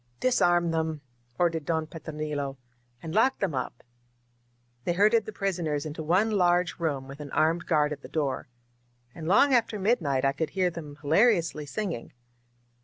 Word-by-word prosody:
"Disarm 175 -9 +3
them 160 -2 -1 0.2
!" 120 0 -39
ordered 165 -3 +1
Don 160 -1 0
Petronilo. 150 -3 -5 0.5
"And 160 -1 -5
lock 255 +6 +3
them 190 -6 -1
up 130 -2 -4 0.5
!" 120 0 -41
They 175 - 0
herded 210 +4 +3
the - - -4
prisoners 170 -8 -2
into 155 +1 -5
one 185 +8 +2
large 180 -3 +2
room, 145 -5 -2
with 140 +2 -10
an 145 -1 -7
armed 165 +4 +1
guard 150 -2 +2
at 140 - -9
the - - -10
door. 140 -5 -2 0.7
And 160 -1 -7
long 265 +10 +5
after 230 -3 +2
midnight 170 - +1
I 135 - +4
could 155 +3 -2
hear 185 0 0
them 150 -4 -8
hilariously 165 -2 +2
singing. 185 - -4
160 Hz, 170 wpm, -27 LUFS, 145-185 Hz, 0.7 s, long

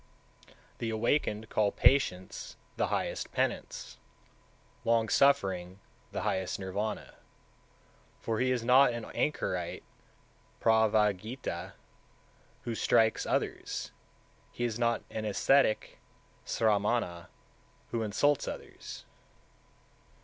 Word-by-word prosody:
184. - - -23 0.2
The 115 - -2
Awakened 110 -1 0
call 105 -2 +2
patience 120 -8 +1 0.2
the - - +1
highest - - -2
penance, - - -2 0.8
long 115 -1 +2
suffering 95 -11 +2 0.3
the - - -3
highest 95 -1 -1
Nirvana; 100 +3 -3 1.1
for 110 -1 -2
he 130 - +2
is 125 -2 0
not 125 +1 +6
an 115 -1 -5
anchorite 90 - -1 0.8
(pravragita) 105 -3 +1 0.9
who 120 - -3
strikes 115 0 +2
others, - - -2 0.6
he 120 - -4
is 120 -1 -1
not 120 -1 +1
an 110 - -3
ascetic 110 +3 +2 0.5
(sramana) 105 -5 +1 0.6
who 115 - -1
insults 130 +7 +1
others. - - -8
110 Hz, 95 wpm, -31 LUFS, 100-120 Hz, 1.1 s, not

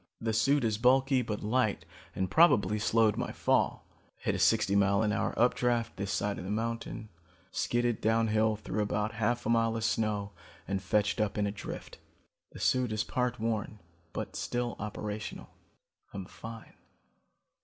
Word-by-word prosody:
The 110 -1 -1
suit 135 +6 +3
is 110 -2 0
bulky 130 +2 +4
but 105 -3 -4
light 110 0 +1 0.3
and 95 -1 -1
probably 110 - +5
slowed 110 -1 +3
my - - -2
fall. - - +1
I - - -30
hit - - +1
a - - -2
sixty 100 - +3
mile 100 +1 +3
an 105 - +1
hour 100 - -1
updraft 120 -1 +2
this 100 0 -3
side 105 -1 -1
of - - -6
the 95 - -6
mountain, 115 0 -3 0.4
skidded 120 +1 0
downhill 110 -1 +2
through 105 0 -3
about 105 +1 -1
half 120 +2 -1
a - - -1
mile 115 -1 +2
of 115 - -3
snow 105 -2 0 0.4
and 95 -1 -1
fetched 105 +1 +1
up 105 -1 -1
in 105 - +1
a 100 - -1
drift. 105 - -8 0.5
The - - -11
suit 125 -3 +2
is 110 -1 0
part 125 0 -1
worn 110 -1 -2 0.3
but - - -5
still 120 0 -2
operational. 105 0 -5 0.6
I'm 95 -2 -5
fine. 115 +4 -10
110 Hz, 165 wpm, -30 LUFS, 105-120 Hz, 0.6 s, probably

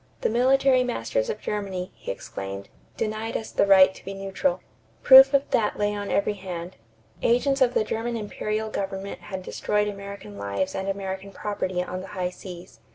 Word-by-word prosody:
"The - - +1
military 260 +2 +4
masters - - -1
of 460 - -3
Germany," 195 -3 -3
he - - -10
exclaimed, 100 0 -7 0.3
"denied 220 +1 -2
us 220 - -7
the - - +2
right 190 -1 +7
to - - -15
be 195 +1 -6
neutral." 190 -2 -1 0.4
Proof 265 +1 +10
of 280 0 +2
that 220 -4 +1
lay 205 0 +1
on 205 -1 -4
every 205 +1 +1
hand. 185 -2 -7 0.5
Agents 270 +3 +2
of 250 -1 +4
the - - +3
German 230 +2 -2
imperial 215 0 -3
government 195 0 -4
had 185 +2 -7
destroyed 210 +2 0
American 200 - -7
lives 100 - -2
and 190 +1 -3
American 195 0 -4
property 185 -3 -2
on 185 0 -5
the 190 - -9
high 180 -1 -1
seas. 180 -1 -11
200 Hz, 175 wpm, -25 LUFS, 185-225 Hz, 0.5 s, Proof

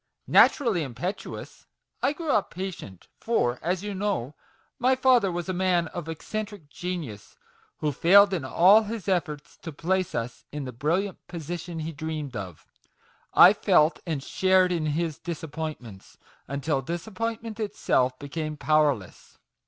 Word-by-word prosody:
Naturally 230 - +4
impetuous, 145 - -6 0.3
I 280 - +2
grew 320 -1 -3
up 205 - +2
patient; 175 - -7
for, 125 - 0
as 180 +3 -1
you 205 -1 -4
know, 190 - -2 0.5
my 255 +2 +3
father 255 -7 +4
was 175 0 -4
a 185 - -1
man 180 -2 +1
of 175 -3 -6
eccentric 200 0 -6
genius, 165 - -6 0.4
who 150 - +1
failed 195 +8 +6
in 170 -6 -1
all 185 +10 +6
his 220 -3 -6
efforts 165 -6 -2
to 165 - -8
place 185 +5 -1
us 115 0 -4
in 145 -1 -5
the 130 - -5
brilliant 170 - -2
position 170 0 -6
he 160 +1 -4
dreamed 155 -3 -5
of. 95 -6 -7 0.7
I - - +9
felt 155 +2 +3
and 150 -5 -2
shared 185 +1 +3
in 165 -3 0
his 155 0 -2
disappointments, 155 - -7 0.3
until 140 +1 -1
disap 170 - -5
pointment 230 0 -3
itself 130 - 0
became 150 +2 -5
powerless 145 - 0
170 Hz, 145 wpm, -26 LUFS, 145-190 Hz, 0.7 s, I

